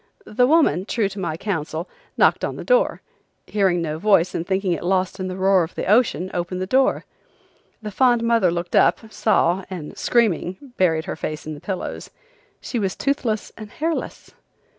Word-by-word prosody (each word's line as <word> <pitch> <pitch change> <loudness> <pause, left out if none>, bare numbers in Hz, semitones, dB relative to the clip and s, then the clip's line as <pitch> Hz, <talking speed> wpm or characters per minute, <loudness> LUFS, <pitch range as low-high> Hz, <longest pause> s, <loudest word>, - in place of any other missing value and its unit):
The 245 +4 +2
woman, 270 - +3
true 220 -1 0
to 200 - -8
my 170 -4 -3
counsel, 165 -3 -3 0.3
knocked - - +3
on - - -2
the - - -7
door; - - +2 0.4
hearing 190 -4 +1
no 155 -1 -3
voice 185 -2 +3
and 170 - -3
thinking 190 -1 0
it 170 - -1
lost 185 +1 0
in 185 - -3
the 185 - -5
roar 190 0 +4
of 165 - -7
the - - -3
ocean 190 - +2
opened 175 +1 -3
the 185 - -2
door. 260 +7 +2 0.8
The 210 - -5
fond 240 +2 +3
mother 230 -5 +3
looked 175 +1 -3
up, 220 -1 +3
saw, 195 -3 +2
and 175 -6 -7
screaming 230 - 0
buried 160 -3 +1
her - - -4
face 155 0 -5
in 155 - -5
the 145 - -10
pillows, 190 -2 -5 0.5
She 240 - -4
was 195 -3 -1
toothless 245 -6 -1
and 215 -2 -9
hairless! 320 +8 -4
190 Hz, 185 wpm, -22 LUFS, 175-220 Hz, 0.8 s, roar